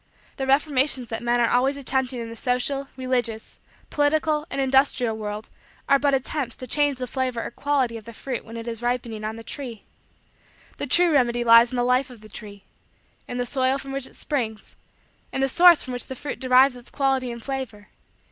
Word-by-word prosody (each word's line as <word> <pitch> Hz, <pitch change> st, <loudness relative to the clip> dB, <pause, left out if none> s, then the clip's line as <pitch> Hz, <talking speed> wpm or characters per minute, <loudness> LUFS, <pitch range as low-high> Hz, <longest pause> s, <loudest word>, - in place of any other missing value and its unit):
The 270 Hz, -, -3 dB
reformations 270 Hz, -2 st, +2 dB
that 225 Hz, -, -4 dB
men 240 Hz, 0 st, +1 dB
are 235 Hz, -1 st, +3 dB
always 265 Hz, +3 st, +2 dB
attempting 265 Hz, -2 st, -2 dB
in 230 Hz, -, -5 dB
the 230 Hz, -, -8 dB
social, 250 Hz, +4 st, -1 dB
religious, 245 Hz, -4 st, -2 dB, 0.3 s
political, 300 Hz, +1 st, +1 dB
and -, -, -4 dB
industrial 265 Hz, -3 st, +2 dB
world 210 Hz, 0 st, -5 dB, 0.4 s
are 275 Hz, -, +5 dB
but 280 Hz, -1 st, +3 dB
attempts 265 Hz, -1 st, -3 dB
to 255 Hz, -, -8 dB
change 290 Hz, +2 st, +1 dB
the 255 Hz, -, -3 dB
flavor 255 Hz, -2 st, -2 dB
or -, -, -5 dB
quality 260 Hz, -3 st, 0 dB
of 220 Hz, -, -12 dB
the 230 Hz, -, -9 dB
fruit 250 Hz, +1 st, -5 dB
when 230 Hz, +1 st, -9 dB
it 230 Hz, +1 st, -7 dB
is 230 Hz, -1 st, -5 dB
ripening 240 Hz, -3 st, -2 dB
on 215 Hz, +1 st, -3 dB
the 225 Hz, -, -9 dB
tree. 240 Hz, -4 st, -7 dB, 0.9 s
The 285 Hz, -, -4 dB
true 345 Hz, +6 st, +4 dB
remedy 240 Hz, -4 st, +2 dB
lies 230 Hz, 0 st, +7 dB
in -, -, -4 dB
the 245 Hz, -, +1 dB
life 250 Hz, +2 st, +2 dB
of 240 Hz, -4 st, -13 dB
the 215 Hz, -, -14 dB
tree; 205 Hz, -1 st, -10 dB, 0.6 s
in 245 Hz, -, -5 dB
the 245 Hz, -, -1 dB
soil 260 Hz, +1 st, +2 dB
from 275 Hz, 0 st, -8 dB
which 275 Hz, -1 st, -4 dB
it -, -, -16 dB
springs; 225 Hz, -7 st, -3 dB, 0.6 s
in -, -, -3 dB
the 270 Hz, -, +3 dB
source 345 Hz, +3 st, +6 dB
from 255 Hz, -, -6 dB
which 245 Hz, -, -4 dB
the 260 Hz, -, -6 dB
fruit 285 Hz, +3 st, -6 dB
derives 255 Hz, 0 st, +5 dB
its 245 Hz, 0 st, -13 dB
quality 265 Hz, -3 st, 0 dB
and 235 Hz, -1 st, -8 dB
flavor. 260 Hz, -7 st, -5 dB
255 Hz, 205 wpm, -24 LUFS, 235-275 Hz, 0.9 s, lies